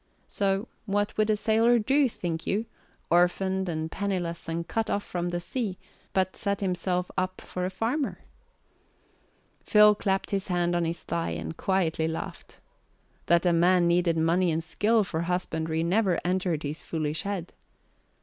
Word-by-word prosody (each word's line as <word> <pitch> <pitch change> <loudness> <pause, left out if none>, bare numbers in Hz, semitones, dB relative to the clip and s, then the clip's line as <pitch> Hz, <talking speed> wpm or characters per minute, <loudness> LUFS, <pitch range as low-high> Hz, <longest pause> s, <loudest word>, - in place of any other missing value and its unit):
So 195 +2 0 0.2
what 205 +1 0
would 215 0 +1
a 215 - +4
sailor 225 +3 +3
do, 270 +5 +3
think 165 -6 -4
you, 215 +3 0 0.5
orphaned 190 +2 +2
and 160 -1 -3
penniless 180 -4 -3
and 165 +1 -3
cut 225 -1 -1
off 205 - 0
from 175 0 -3
the 175 0 -2
sea, 195 +1 -3 0.3
but 185 -1 0
set 200 -2 -1
himself 180 -1 -1
up 185 0 -2
for 180 0 -4
a - - -1
farmer? 230 +10 -2 1.4
Phil 210 0 +6
clapped 195 -1 -1
his 195 -1 -1
hand 175 -2 +1
on 175 -1 +1
his 165 +1 -3
thigh 170 -1 -2
and - - -5
quietly 165 -4 0
laughed. 160 0 -6 0.7
That 170 +1 +4
a 175 - +4
man 175 +1 +4
needed 170 -1 +2
money 170 +3 +2
and 160 +1 -1
skill 215 +6 +2
for 165 -4 -3
husbandry 165 -2 -1
never 185 0 +2
entered 180 -3 0
his 150 +2 -4
foolish 155 -1 -2
head. 195 -4 -4
180 Hz, 160 wpm, -27 LUFS, 170-200 Hz, 1.4 s, Phil